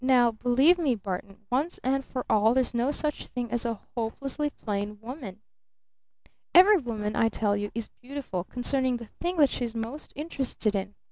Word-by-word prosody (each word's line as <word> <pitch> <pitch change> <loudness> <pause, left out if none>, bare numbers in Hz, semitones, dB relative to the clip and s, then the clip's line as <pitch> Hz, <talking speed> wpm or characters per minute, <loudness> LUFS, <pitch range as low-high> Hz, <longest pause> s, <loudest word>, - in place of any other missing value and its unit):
"Now 250 -2 +5
believe 250 +10 +4
me, 280 -7 +2
Barton, 200 +1 -6
once 285 +8 0
and 270 +1 +1
for 255 -1 -5
all, 220 +3 +4
there 260 - +5
's 250 - -7
no 240 +3 +1
such 295 0 -1
thing 245 -3 -4
as 240 0 +1
a 230 -3 -3 0.2
'hopelessly 270 +5 -2
plain 210 -5 -4
woman'! 225 -4 -8 1.1
Every 390 +4 +9
woman, 220 - -3
I 225 - +3
tell 205 -1 +1
you, 205 0 -2
is 230 -1 -4
beautiful 255 -9 -4
concerning 250 +3 0
the 235 -2 -10
thing 350 +1 -1
that 290 -3 +6
she's 235 -2 -3
most 230 +7 -5
interested 270 -8 -2
in! 200 0 -3
245 Hz, 180 wpm, -28 LUFS, 215-275 Hz, 1.1 s, Every